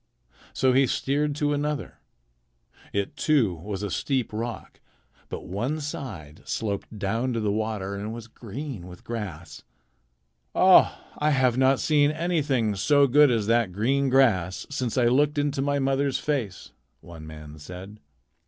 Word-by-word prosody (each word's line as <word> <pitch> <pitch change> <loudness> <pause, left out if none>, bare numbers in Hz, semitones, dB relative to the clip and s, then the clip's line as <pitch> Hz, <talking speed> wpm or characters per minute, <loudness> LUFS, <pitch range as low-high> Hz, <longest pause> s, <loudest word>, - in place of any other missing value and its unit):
So 130 -1 +2
he 135 +1 +4
steered 145 +4 0
to 145 0 0
another. 145 0 -3 0.9
It, 100 +9 -2
too, 135 - +2
was 95 +4 -6
a 100 - -3
steep 130 -1 -1
rock, 115 +1 -5 0.5
but - - -6
one 120 - -2
side 100 - -7
sloped 105 0 -4
down 115 +6 -1
to 115 - -1
the 105 -2 0
water 105 -2 -2
and 100 +2 -4
was 115 0 -7
green 115 - -7
with 90 -1 -12
grass. 95 -9 -6 0.9
"Oh, - - +6 0.2
I 150 - +2
have 130 -4 +3
not 130 +1 +3
seen 145 -2 +3
anything 150 -9 0
so 140 +8 +4
good 145 +2 +6
as 115 -4 +1
that 115 -3 +2
green 135 +7 +1
grass 105 -9 +2
since 130 -5 -2
I 125 - +4
looked 145 +5 +3
into 145 -1 0
my 145 +1 +1
mother's 135 0 +1
face," 125 -11 -3 0.3
one 80 -2 -11
man 75 0 -10
said. 90 +7 -10
120 Hz, 150 wpm, -26 LUFS, 100-140 Hz, 0.9 s, Oh